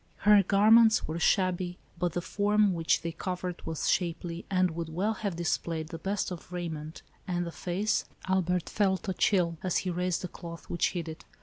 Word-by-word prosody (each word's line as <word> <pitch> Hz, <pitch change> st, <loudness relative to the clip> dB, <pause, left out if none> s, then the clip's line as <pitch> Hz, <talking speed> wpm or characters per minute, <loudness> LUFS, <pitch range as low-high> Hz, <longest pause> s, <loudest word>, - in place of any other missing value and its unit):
Her 210 Hz, -1 st, +8 dB
garments 220 Hz, +4 st, +5 dB
were 160 Hz, +2 st, -3 dB
shabby, 185 Hz, -1 st, +1 dB, 0.2 s
but 175 Hz, -2 st, 0 dB
the 175 Hz, -, -1 dB
form 205 Hz, 0 st, +2 dB
which 165 Hz, -1 st, +1 dB
they 170 Hz, -, -2 dB
covered 180 Hz, 0 st, -4 dB
was 160 Hz, -1 st, -2 dB
shapely, 170 Hz, -1 st, -1 dB
and 185 Hz, -2 st, +2 dB
would 165 Hz, 0 st, -4 dB
well 190 Hz, +7 st, 0 dB
have 205 Hz, -4 st, -3 dB
displayed 165 Hz, -1 st, -2 dB
the 165 Hz, -, -7 dB
best 195 Hz, +2 st, -2 dB
of 175 Hz, 0 st, -8 dB
raiment, 160 Hz, -3 st, -5 dB, 0.2 s
and 175 Hz, -1 st, -1 dB
the 170 Hz, -, -5 dB
face 190 Hz, +6 st, -1 dB
— -, -, -16 dB
Albert 180 Hz, -2 st, +1 dB
felt 190 Hz, -3 st, 0 dB
a 190 Hz, -, 0 dB
chill, 175 Hz, -3 st, +2 dB
as 185 Hz, -2 st, 0 dB
he 180 Hz, -, 0 dB
raised 180 Hz, +1 st, -1 dB
the -, -, -2 dB
cloth 170 Hz, -1 st, -9 dB
which 170 Hz, -, +1 dB
hid 170 Hz, -3 st, -3 dB
it. 160 Hz, 0 st, -8 dB
180 Hz, 195 wpm, -29 LUFS, 170-190 Hz, 0.2 s, Her